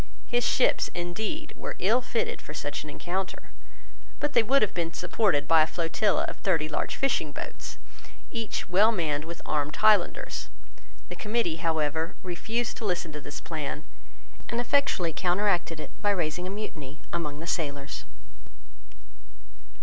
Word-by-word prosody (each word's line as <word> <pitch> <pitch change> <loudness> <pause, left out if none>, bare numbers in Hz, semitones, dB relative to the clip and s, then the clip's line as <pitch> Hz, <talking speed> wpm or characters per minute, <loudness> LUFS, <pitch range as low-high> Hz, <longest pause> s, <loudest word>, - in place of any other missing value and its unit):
His 240 0 +1
ships, 255 - +3
indeed, 215 - -3
were - - -5
ill 225 +7 +4
fitted 245 -2 -1
for 150 - -8
such 145 -1 -3
an 155 - -8
encounter. 185 +5 -3 0.7
But 295 0 0
they 235 - +7
would 265 +4 +4
have 210 - +1
been 165 -1 -1
supported 180 -6 +2
by 165 -1 +7
a 155 - +5
flotilla 170 +5 +1
of - - -3
thirty 165 -5 +2
large 155 - -1
fishing 250 - +1
boats, - - -6 0.5
each 230 -3 -2
well 200 +5 +6
manned 155 -7 0
with 170 +1 -7
armed 150 0 0
Highlanders. 210 -4 +3 0.6
The - - -5
Committee, 210 -7 0
however, 160 +1 0
refused 220 +6 -2
to 225 - -4
listen 175 -4 0
to 150 0 -6
this 145 - -6
plan, 155 -1 -4 0.6
and 235 - 0
effectually 240 - +2
counteracted 180 -2 +1
it - - -6
by 205 - +3
raising 180 -2 0
a - - -3
mutiny 160 -8 -6
among 150 -4 -2
the 165 - -5
sailors. 145 -4 -2
175 Hz, 150 wpm, -28 LUFS, 155-215 Hz, 0.7 s, they